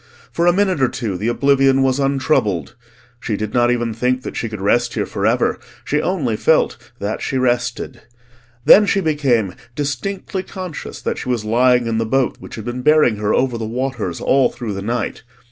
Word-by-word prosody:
For 170 +1 +1
a - - +7
minute 185 -4 +1
or 130 - +5
two 115 -6 -4
the 105 +5 -3
oblivion 135 +2 +3
was 130 +1 +1
untroubled; 135 - 0 0.5
she 110 -3 -3
did 110 0 -4
not 120 -1 +3
even 120 -2 0
think 125 +3 0
that - - -6
she 115 - -3
could 110 -2 -6
rest 120 +5 +1
here - - 0
for - - -1
ever, - - +1 0.3
she 150 +1 0
only 150 - -1
felt - - +1
that 105 +2 -3
she 130 - -2
rested. 125 0 -1 0.6
Then 210 0 +8
she 200 - +2
became 135 - +1 0.2
distinctly 150 +8 -3
conscious 185 -3 -8
that - - -2
she - - -5
was 120 -4 -1
lying 125 +2 +3
in 115 -1 -1
the 115 - 0
boat 135 +1 +1
which - - -10
had 110 - -8
been 120 +1 -4
bearing 150 -6 +4
her 105 0 -1
over 125 -3 +1
the 110 - -3
waters 120 -7 -3
all 135 -1 +3
through 115 -4 -5
the 100 - -5
night. 115 +3 -3
125 Hz, 195 wpm, -19 LUFS, 115-140 Hz, 0.6 s, Then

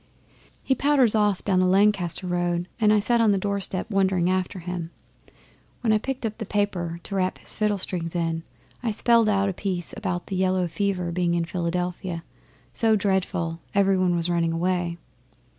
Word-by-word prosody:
'He 265 - +2
powders 275 -5 +3
off 210 -3 +1
down 190 -3 +2
the 185 - +3
Lancaster 195 -2 +2
road, 175 0 -1
and 215 -2 +4
I 215 - +5
sat 235 +3 +2
on 220 -2 +4
the 200 - +2
doorstep 200 -1 -1
wondering 190 -2 +2
after 185 +1 -1
him. 175 -1 -5 0.9
When 225 -3 +2
I 215 - +3
picked 265 +1 -4
up 220 0 -4
the - - -2
paper 180 -5 -1
to - - -6
wrap 185 -1 0
his - - -4
fiddle 210 -1 0
strings 175 -3 -3
in, 165 -1 -1 0.4
I 240 - -1
spelled 230 +1 +3
out 195 -1 +2
a 195 - -1
piece 180 -2 -2
about 180 -4 -3
the 195 - -4
yellow 185 -1 +1
fever 180 0 -1
being 175 0 0
in 170 -1 0
Philadelphia 175 0 -3 0.5
so 225 -1 +3
dreadful 185 -4 -1 0.2
every 195 -1 +4
one 185 -1 +2
was 170 0 0
running 170 -1 +1
away. 175 0 -1
185 Hz, 180 wpm, -25 LUFS, 175-205 Hz, 0.9 s, I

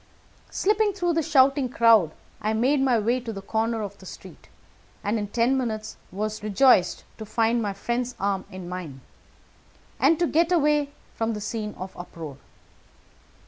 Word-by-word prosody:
Slipping 420 +1 +1
through 350 -3 0
the 325 - +2
shouting 275 -3 +3
crowd, 230 -8 +5 0.3
I 215 +1 0
made 260 +6 +2
my 260 -3 +3
way 235 +4 +1
to 235 -2 -6
the 200 - -6
corner 225 +1 -1
of 200 0 -7
the 190 - -12
street, - - -12 0.5
and 215 +2 0
in 205 - -3
ten 235 +5 +1
minutes 220 -5 -3 0.2
was 215 +3 -3
rejoiced 210 -2 +3 0.2
to - - -5
find 230 +2 +1
my 205 -2 -2
friend's 240 +5 -3
arm 195 -1 -1
in 185 -3 -8
mine, 175 -7 -7 1.0
and 330 - +4
to 345 - +2
get 335 +2 +2
away 300 -4 +3 0.2
from 225 0 -1
the - - -4
scene 210 0 -4
of 185 +1 -8
uproar. 165 -5 -8
225 Hz, 165 wpm, -25 LUFS, 205-270 Hz, 1.0 s, crowd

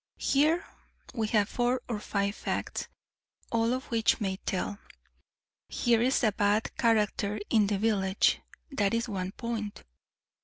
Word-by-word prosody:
Here 310 +5 +2 0.5
we 220 -2 -1
have 210 -2 +2
four 245 +2 0
or 230 -4 -2
five 200 -1 -1
facts, - - -3 0.6
all 230 0 +2
of 255 +1 -1
which 225 -2 +2
may 190 -2 -1
tell. 200 +2 -2 0.9
Here 235 -2 +2
is 255 +2 +2
a 215 - +4
bad 205 +2 +1
character 210 -2 +1
in 215 -3 +4
the 205 -1 0
village; 195 -2 +2 0.3
that 205 -5 +1
is 230 +1 -1
one 190 -4 -3
point. 225 -2 -5
215 Hz, 140 wpm, -29 LUFS, 205-235 Hz, 0.9 s, a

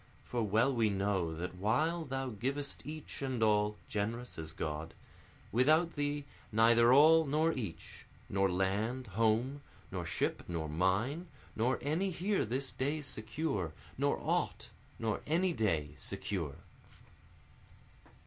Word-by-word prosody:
For 120 - -2
well 110 +5 +3
we 115 -3 +3
know 95 -4 0
that 90 +3 -4
while 155 - +1
thou 135 -1 -2
givest 135 +6 -3
each 155 -1 -7
and 130 -4 -1
all, 105 -1 +3
(generous 110 +1 -3
as 80 -1 -5
God,) 80 +1 -4 0.6
Without 155 - +4
thee 145 0 -2 0.3
neither 115 +2 +6
all 160 +4 +7
nor 155 +3 +2
each, 105 -10 -6 0.2
nor 95 0 +2
land, 100 +8 0
home, 115 +6 +1 0.3
Nor - - -3
ship, - - -1
nor 85 -2 -2
mine, 95 - 0 0.3
nor 120 +4 +2
any 160 +7 +1
here 190 +3 0
this 130 +5 -2
day 145 +3 -1
secure, 110 - -2 0.2
Nor - - +1
aught, - - -1 0.3
nor 110 -2 -1
any 175 +4 +2
day 80 - 0
secure. 85 -9 -3
115 Hz, 130 wpm, -33 LUFS, 100-145 Hz, 0.6 s, all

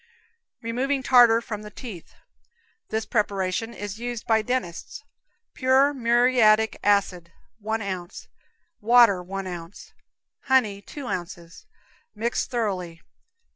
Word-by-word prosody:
Removing 260 +4 -1
Tartar 240 -3 +6
from 215 -3 -6
the 210 - -9
Teeth. 210 -5 -10 0.7
This 220 0 -2
preparation 200 0 -1
is 205 -1 -7
used 240 -1 -5
by 220 -1 +3
dentists. 215 -7 -4 0.5
Pure 265 +2 +3
muriatic 235 -3 +3
acid, 185 -4 +1 0.3
one 220 +1 -3
ounce; 185 -3 -6 0.5
water, 230 -4 +5
one 195 +2 -6
ounce; 175 0 -9 0.5
honey, 225 -7 +2
two 280 +7 -9
ounces; 175 - -7 0.5
mix 230 +3 -2
thoroughly. 185 -8 -3
220 Hz, 105 wpm, -24 LUFS, 190-240 Hz, 0.7 s, Tartar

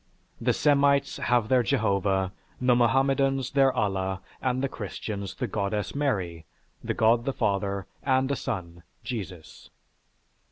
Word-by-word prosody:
The - - +3
Semites 140 -1 +3
have 120 -3 +1
their 130 +1 +4
Jehovah, 100 -6 +1 0.3
the 125 -1 +4
Mohammedans 135 +2 +2
their 135 -1 +4
Allah, 95 -3 -1 0.2
and 130 0 0
the - - +2
Christians 100 -3 -5
the 130 - -2
Goddess 105 -2 -2
Mary, 90 - -2 0.4
the - - -2
God 115 +2 +3
the 135 - +1
Father, 100 -2 -1 0.2
and 130 0 +2
a - - +1
son 90 -10 -5 0.2
Jesus. 90 - -7
115 Hz, 130 wpm, -27 LUFS, 95-135 Hz, 0.4 s, their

